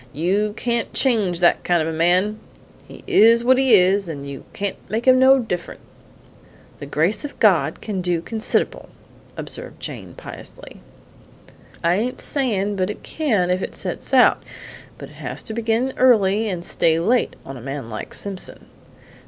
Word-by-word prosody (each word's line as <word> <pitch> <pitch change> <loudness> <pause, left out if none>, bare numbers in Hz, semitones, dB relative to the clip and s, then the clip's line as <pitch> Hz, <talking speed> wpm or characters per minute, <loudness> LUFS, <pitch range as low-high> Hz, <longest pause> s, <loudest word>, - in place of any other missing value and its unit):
You 195 +7 0
can't 235 -1 -1
change 205 -9 +2
that 175 - +3
kind 175 -1 +2
of 160 - -1
a 165 - -3
man; 180 +6 +2 0.5
he - - -13
is 230 +2 +5
what 255 +1 +4
he 265 -4 +6
is, 190 0 +3
and 140 -3 -6
you 140 -1 -8
can't 200 -1 -3
make 225 +3 -2
him 255 0 +6
no 265 +1 +6
different!" 180 -9 -4 1.0
"The 145 - -8
grace 165 - 0
of 290 - -8
God - - +3
can 200 -4 -3
do 175 -1 0
consid'rable," 220 +7 -1 0.5
observed - - -8
Jane - - -8
piously. - - -9 1.0
"I 170 +2 +2
ain't 245 +4 -2
sayin' 210 -8 -1
but 185 0 -1
it 210 - -7
can 215 - 0
if 180 +1 0
it - - -5
sets - - -5
out, - - +5 0.6
but - - -10
it - - -17
has - - -6
to 220 - -6
begin 230 +3 -1
early 220 -4 +3
and 175 -3 -4
stay 160 -1 +2
late 235 +9 +1
on 135 - -8
a 125 - -10
man 135 -2 -6
like 110 - -7
Simpson." 195 -2 -8
200 Hz, 170 wpm, -21 LUFS, 175-235 Hz, 1.0 s, he